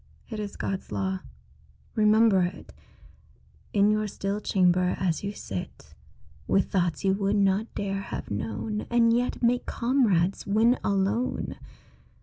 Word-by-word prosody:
It 220 - -4
is 205 -1 -5
God's 190 -1 -4
law. 190 0 -1 0.7
Remember 215 -2 +4
it 180 +1 -4 1.0
In 205 0 +4
your 215 0 0
still 200 0 -3
chamber 180 -2 +2
as 175 -2 -1
you 200 - -2
sit 95 - -7 0.5
With 195 - +1
thoughts 175 -4 0
you 190 -1 +3
would 200 +1 0
not 200 +2 +1
dare 195 -1 -2
have 195 - -6
known, 110 - -3
And 230 -1 +4
yet 245 +1 -1
make 245 +1 +2
comrades 220 -8 +1
when 225 +5 +3
alone. 200 +5 0
200 Hz, 135 wpm, -27 LUFS, 190-220 Hz, 1.0 s, Remember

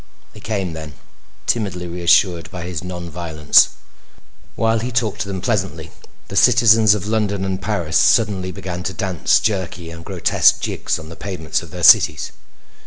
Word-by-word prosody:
They 105 - -13
came 100 -5 -3
then, 80 -2 -9 0.5
timidly 95 -6 -2
reassured 85 0 +1
by 90 -2 -7
his 90 -1 -6
non 90 -1 -6
violence. 80 -3 +3 0.9
While 115 0 +1
he 120 +3 -4
talked 115 -3 -1
to - - -3
them 95 -2 -5
pleasantly 95 -9 -2 0.4
the 100 - -8
citizens 110 -2 +5
of 100 -2 -5
London 105 -3 -1
and 95 0 -3
Paris 90 - -1
suddenly 95 -2 +2
began 90 -1 -6
to 95 - -4
dance 95 -5 +1
jerky 90 -5 -3
and 85 0 -10
grotesque - - +2
jigs - - -3
on 80 0 -10
the 85 - -10
pavements 90 -6 -4
of - - -12
their - - -8
cities. - - +5
95 Hz, 165 wpm, -19 LUFS, 85-105 Hz, 0.9 s, citizens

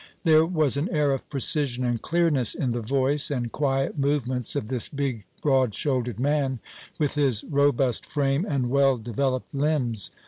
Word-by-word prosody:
There 160 -1 +5
was 155 -6 +2
an 150 +6 -1
air 150 -4 +1
of 135 - -4
precision 135 -2 0
and 120 -2 -1
clearness 160 -8 +1
in 130 - -1
the 120 0 -2
voice 135 +5 +1
and 120 -5 -3
quiet 135 0 -1
movements 130 -4 -1
of 140 -7 -2
this 125 -2 0
big, 135 -7 -3 0.2
broad 130 -7 +2
shouldered 125 -6 -1
man, 140 -1 0 0.4
with 150 -3 0
his 135 -7 +1
robust 140 -4 +1
frame 140 +1 0
and 135 - -1
well 135 -1 +3
developed 125 +3 -2
limbs. 135 -7 0
135 Hz, 165 wpm, -25 LUFS, 125-145 Hz, 0.4 s, There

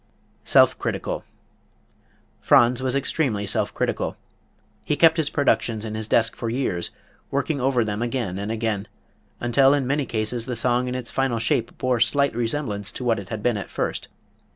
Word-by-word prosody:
Self - - +5
Critical. - - -3 1.2
Franz 120 +1 +4
was 130 0 0
extremely 135 -7 0
self 100 - +1
critical. - - -2 0.7
He 150 - 0
kept 165 +2 +5
his 155 -2 +1
productions 115 -7 +1
in 110 - -5
his 110 0 -3
desk 115 0 +2
for 115 - -4
years, 115 -8 -1 0.4
working 140 0 -1
over 125 -3 +2
them 105 +1 -3
again 120 -6 -2
and 100 +2 -3
again, 110 -2 -2 0.5
until 135 +3 +4
in 140 -2 -1
many 140 +1 0
cases 115 +1 -2
the 125 - -2
song 125 +2 +1
in 125 - -3
its 125 -2 -4
final 135 -3 0
shape 115 +1 -1
bore 130 -2 0
slight 140 +3 +2
resemblance 115 -4 -2
to - - -6
what 115 -3 +1
it 100 - -9
had 110 -2 -5
been 120 -3 +2
at 100 - -6
first. - - -3
120 Hz, 175 wpm, -23 LUFS, 110-135 Hz, 1.2 s, Self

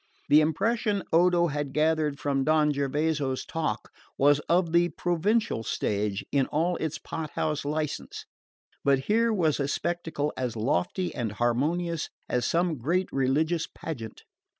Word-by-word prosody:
The 150 +1 +7
impression 200 +6 0
Odo 175 +1 +4
had 145 -3 -3
gathered 155 -1 +1
from 140 -2 0
Don 150 0 +3
Gervaso's 140 -1 -1
talk 155 -9 -3 0.3
was 145 +1 +5
of 170 -1 +3
the 170 +1 +4
provincial 175 - 0
stage 105 -2 -2
in 135 -2 +2
all 170 +4 0
its 155 -1 -3
pothouse 155 -1 -3
license; 150 +1 -3 0.6
but 140 -1 +4
here 225 +9 +2
was 165 -9 +1
a 140 - 0
spectacle 160 -1 -2
as 125 -3 -3
lofty 110 - -1
and 110 -4 -3
harmonious 150 +9 0 0.2
as 125 - 0
some 170 -4 +1
great 175 +9 0
religious 150 +5 +1
pageant. 115 -9 -7
155 Hz, 135 wpm, -27 LUFS, 135-170 Hz, 0.6 s, The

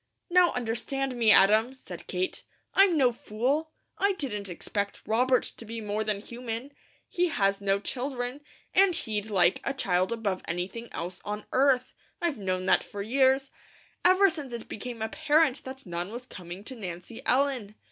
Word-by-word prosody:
"Now 360 0 +6
understand 250 +3 -2
me, 230 -2 +3
Adam," 215 +5 +6
said 180 -9 -10
Kate. 185 0 -2 0.3
"I'm 385 -4 +5
no 255 -4 +5
fool. 255 +8 -1 0.3
I 400 0 +3
didn't 210 - -3
expect 200 +3 -3
Robert 250 +3 +3
to - - -8
be 230 +1 -6
more 210 0 -2
than 210 -2 -1
human. 235 +3 -6 0.4
He 360 0 +1
has 195 - +1
no 195 0 +2
children, 250 +3 -3 0.3
and 380 -2 +5
he'd 215 -6 -2
like 185 -3 +3
a 275 - -2
child 185 -6 +1
above 210 -5 -1
anything 180 +7 -4
else 175 +2 -5
on 210 0 -4
earth. 260 -1 +3 0.3
I've 335 -9 -1
known 185 -2 -1
that - - +4
for 200 -1 -6
years, 265 +3 +3 0.5
ever 375 +2 +6
since 300 -7 -4
it 235 -1 -6
became 230 0 -5
apparent 300 +3 +2
that 265 +1 -8
none 175 +2 -4
was 245 +2 -7
coming 180 -4 -9
to 260 - -7
Nancy 185 +1 -7
Ellen. 255 -6 +1
230 Hz, 165 wpm, -28 LUFS, 200-270 Hz, 0.5 s, Now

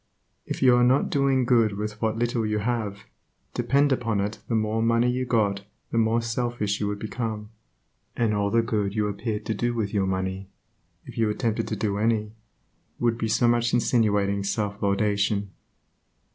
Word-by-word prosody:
If - - -3
you 125 -2 +7
are 120 - +4
not 130 +3 +3
doing 135 -2 +2
good 115 -5 +3
with 105 0 -5
what 110 -1 0
little 120 0 0
you 105 0 0
have, 105 -2 -2 0.5
depend 140 +1 +2
upon 115 -5 0
it 100 +2 -2
the 115 - 0
more 110 0 0
money 115 +1 +3
you 130 +1 -2
got 100 -4 +1 0.3
the 115 - +1
more 115 +1 +2
selfish 115 -3 -1
you 105 - -1
would 105 0 -2
become, 110 0 -4 0.7
and 115 -3 +2
all 100 -1 +1
the 115 +2 +2
good 105 -3 -1
you 105 -1 +1
appeared 105 +1 -3
to 110 - -1
do 120 +3 -1
with 110 -2 -2
your 100 -2 +1
money, 95 +1 -3 0.6
if - - -8
you 110 -1 +2
attempted 110 +1 -1
to 110 - -2
do 100 -1 -1
any, 110 -1 0 0.6
would 120 -1 0
be 110 - 0
so 110 +2 +2
much 120 0 +2
insinuating 105 -5 +2
self 100 0 -2
laudation. 100 0 +1
110 Hz, 180 wpm, -25 LUFS, 105-120 Hz, 0.7 s, you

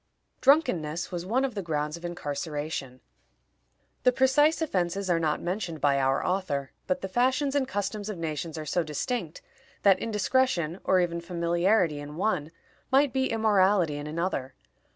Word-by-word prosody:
Drunkenness 180 - +2
was 175 0 -4
one 255 +6 +2
of 260 - -3
the 200 - -3
grounds 150 -3 -2
of 170 - -11
incarceration. 145 -5 -4 1.0
The 250 - +5
precise 270 +5 +3
offenses 190 - -1
are 170 - +3
not 155 -2 0
mentioned 180 -3 -3
by 140 -1 +3
our 135 0 +1
author, 160 -8 -1 0.2
but 275 0 0
the - - -3
fashions 260 +7 +1
and 280 -2 +1
customs 205 -2 -3
of 210 - -4
nations 160 0 -4
are 155 - -5
so 175 +4 +1
distinct, 245 - -3 0.4
that 195 -2 +5
indiscretion, 210 -6 0
or 185 - +3
even 170 -1 -1
familiarity 170 -1 +1
in 145 +1 -8
one, 165 -5 0 0.4
might 270 -1 +4
be 265 0 +1
immorality 200 -7 +3
in 145 0 -6
another. 155 -4 -3
180 Hz, 155 wpm, -27 LUFS, 155-225 Hz, 1.0 s, The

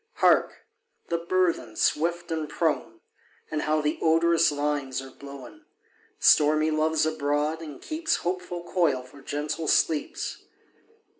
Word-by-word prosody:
Hark! - - +2 0.4
the 170 - 0
burthen, 170 -9 0
swift 170 +6 0
and 160 -2 -2
prone! 150 -8 -1 0.5
And 155 -1 -1
how 155 0 +1
the 150 +1 -1
odorous 165 0 +4
limes 145 -3 -2
are 135 0 -9
blown! 140 - -12 0.5
Stormy 155 +1 +4
Love's 155 0 +2
abroad, 150 +1 -1
and 150 -4 -8
keeps 320 +1 -1
Hopeful 180 -1 -3
coil 165 -8 +1
for 140 +2 -15
gentle 150 +3 -3
sleeps. 155 -2 0
155 Hz, 125 wpm, -26 LUFS, 145-170 Hz, 0.5 s, odorous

